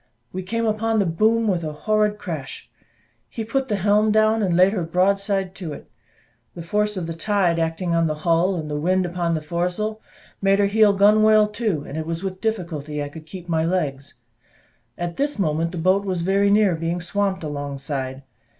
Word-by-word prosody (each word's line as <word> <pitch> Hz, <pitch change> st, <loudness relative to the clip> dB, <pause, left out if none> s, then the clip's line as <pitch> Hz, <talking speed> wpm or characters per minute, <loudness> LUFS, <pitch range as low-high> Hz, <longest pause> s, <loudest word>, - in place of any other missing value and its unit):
We 185 Hz, -, -3 dB
came 230 Hz, +5 st, -2 dB
upon 225 Hz, +1 st, 0 dB
the 200 Hz, -, +3 dB
boom 220 Hz, +7 st, +2 dB
with 180 Hz, -4 st, 0 dB
a 155 Hz, -1 st, -4 dB
horrid 210 Hz, +5 st, +1 dB
crash; 160 Hz, -9 st, -7 dB, 0.6 s
he 225 Hz, -, -5 dB
put 265 Hz, +4 st, -1 dB
the 210 Hz, -, 0 dB
helm 205 Hz, +2 st, +3 dB
down, 215 Hz, +1 st, +3 dB
and 180 Hz, -4 st, +1 dB
laid 185 Hz, +2 st, +5 dB
her 185 Hz, -5 st, -1 dB
broadside 195 Hz, +2 st, 0 dB
to 170 Hz, -6 st, -5 dB
it. -, -, -12 dB, 0.6 s
The 170 Hz, -, -7 dB
force 210 Hz, +3 st, 0 dB
of 180 Hz, -, -3 dB
the 165 Hz, -, -4 dB
tide 175 Hz, -1 st, +1 dB
acting 165 Hz, +2 st, -1 dB
on 165 Hz, -1 st, +2 dB
the 155 Hz, -, -2 dB
hull, 170 Hz, +3 st, +3 dB
and 160 Hz, -3 st, -4 dB
the 150 Hz, 0 st, -3 dB
wind 185 Hz, +4 st, +1 dB
upon 175 Hz, -1 st, -1 dB
the 155 Hz, -, -4 dB
foresail, 180 Hz, +7 st, -2 dB, 0.4 s
made 195 Hz, 0 st, +3 dB
her 200 Hz, -, +3 dB
heel 210 Hz, 0 st, +4 dB
gunwale 215 Hz, +1 st, +5 dB
to, 210 Hz, -9 st, -2 dB
and 150 Hz, +2 st, -6 dB
it 160 Hz, -, -5 dB
was 165 Hz, +2 st, -3 dB
with 185 Hz, -1 st, -5 dB
difficulty 160 Hz, -9 st, -3 dB
I 145 Hz, -, -5 dB
could 155 Hz, +1 st, -12 dB
keep 180 Hz, 0 st, -9 dB
my 160 Hz, -2 st, +1 dB
legs; 145 Hz, -6 st, -2 dB, 0.8 s
at 175 Hz, -1 st, -4 dB
this 285 Hz, -1 st, -1 dB
moment, 165 Hz, -3 st, 0 dB
the 180 Hz, -, -6 dB
boat 185 Hz, +4 st, +2 dB
was 185 Hz, -4 st, -2 dB
very 200 Hz, +2 st, +2 dB
near 205 Hz, -2 st, +4 dB
being 165 Hz, +2 st, -2 dB
swamped 190 Hz, +1 st, -1 dB
alongside. 140 Hz, -2 st, -4 dB
185 Hz, 195 wpm, -22 LUFS, 165-210 Hz, 0.8 s, laid